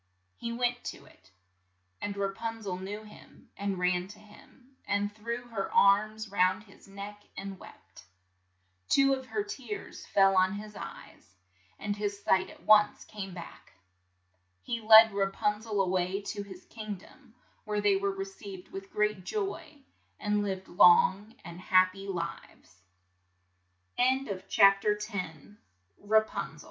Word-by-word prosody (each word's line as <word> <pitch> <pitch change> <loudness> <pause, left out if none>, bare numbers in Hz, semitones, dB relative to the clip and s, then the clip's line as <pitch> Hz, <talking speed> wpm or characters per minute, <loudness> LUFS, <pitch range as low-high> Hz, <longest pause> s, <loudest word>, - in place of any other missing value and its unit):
He 235 - -5
went 245 +1 -1
to - - -7
it, 95 - -21 0.7
and 200 -1 -4
Ra 200 0 0
pun 225 +1 -5
zel 190 -3 -3
knew 205 +3 -6
him, 210 - -16
and 200 -1 -2
ran 180 0 +1
to 205 +2 -12
him, 250 +5 -19
and 205 0 0
threw 235 +3 -5
her 200 -4 -3
arms 215 +1 +3
round 185 0 +2
his 200 -2 -19
neck 200 +1 -9 0.2
and 195 -1 -6
wept. - - -15 0.8
Two 275 0 +5
of 260 -1 -4
her 420 +9 -2
tears 260 - -7
fell 195 -1 +4
on 185 +1 +4
his 210 +1 -8
eyes, 95 - -11 0.4
and 205 0 -3
his 205 -1 -3
sight 190 0 +2
at - - -15
once 210 -1 +5
came 195 -3 -7
back 170 -2 -11 0.9
He 235 -1 -3
led 220 0 +9
Ra 195 -1 +1
pun 210 +2 -1
zel 215 -2 -3
a 195 - +2
way 185 +1 0
to 205 0 -5
his 190 -2 -11
king 215 -2 -6
dom, 230 +5 -18 0.3
where 210 -1 -2
they 205 -1 +3
were 200 +1 0
received 195 -1 -7
with 195 0 -9
great 210 -2 0
joy, 325 - -4
205 Hz, 125 wpm, -30 LUFS, 195-220 Hz, 0.9 s, led